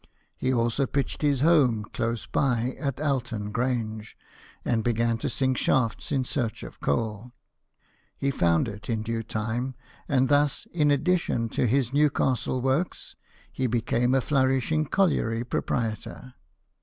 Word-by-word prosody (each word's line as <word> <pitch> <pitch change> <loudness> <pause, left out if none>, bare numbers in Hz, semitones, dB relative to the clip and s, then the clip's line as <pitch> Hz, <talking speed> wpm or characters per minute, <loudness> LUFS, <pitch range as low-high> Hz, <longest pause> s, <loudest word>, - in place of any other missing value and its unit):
He 130 - -1
also 120 +2 +1
pitched 140 +1 -2
his 145 -3 +2
home 140 -9 +4
close 115 0 -2
by 125 -2 0
at 140 -3 -2
Alton 120 -8 -1
Grange, 110 -3 -2 0.5
and 115 -2 +1
began 115 0 +1
to - - -2
sink 130 -2 0
shafts 115 -4 +1
in 135 -3 +1
search 120 -4 -2
of - - -10
coal. 110 - -2 0.8
He 140 - 0
found 85 -8 +2
it 105 +1 -8
in 110 -2 -1
due 115 0 -2
time; 115 +4 -3 0.3
and 130 -2 +3
thus, 145 0 +2
in 150 -4 +3
addition 145 -5 +1
to 125 - 0
his 130 +1 +1
New 150 +1 +4
castle 130 -2 0
works, 135 +7 -1 0.4
he 130 - -1
became 120 +2 +1
a 135 - +3
flourishing 135 +3 +1
colliery 120 - +1
proprietor. 120 +1 -3
125 Hz, 145 wpm, -26 LUFS, 115-140 Hz, 0.8 s, home